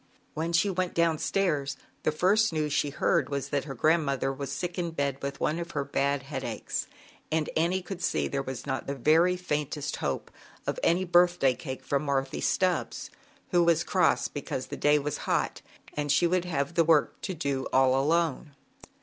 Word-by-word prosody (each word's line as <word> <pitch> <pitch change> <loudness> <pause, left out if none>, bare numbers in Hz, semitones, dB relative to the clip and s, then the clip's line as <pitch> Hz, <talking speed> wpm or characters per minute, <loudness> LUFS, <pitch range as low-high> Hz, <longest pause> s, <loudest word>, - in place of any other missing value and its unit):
When 160 +2 -2
she 170 +4 +3
went 185 -1 -2
down 165 -2 +2
stairs, 145 -8 0 0.2
the - - +1
first 195 +8 +3
news 155 -2 -1
she 145 - +1
heard 135 -1 +1
was, 140 -2 -3
that 140 -2 -1
her 135 -3 -6
grand 160 +6 +3
v - - -4
mother 135 0 0
was 140 0 -5
sick 180 0 -3
in 170 -1 -1
bed 140 -4 -2
with 140 0 -4
one 155 +3 0
of 170 0 -6
her 140 -2 -1
D^d 140 0 0
headaches, 135 - -4 0.4
and 155 -1 0
Annie 175 +3 +1
could 180 0 -7
see - - 0
there 140 -1 -2 0.2
not 130 -3 -3
the 140 - -2
very 165 +7 +4
faintest 150 -4 -3
hope - - -3 0.3
of - - -2
any 175 +3 +2
thday 175 -7 +4
cake 130 -2 -7
from 140 -1 0
Marthy 135 -1 -1
Stubbs, 185 -1 0 0.4
who 175 -2 +5
cross - - +2
because - - -4
the - - -6
day 150 0 +3
was 145 0 -2
hot - - 0 0.3
and 145 -1 -1
uld 175 +1 +2
have 145 -3 -2
the 165 - +4
work 160 -2 +2
to 190 - -4
do 140 -4 -2
all 130 0 +4
alone. 155 +1 0
150 Hz, 185 wpm, -28 LUFS, 140-170 Hz, 0.4 s, who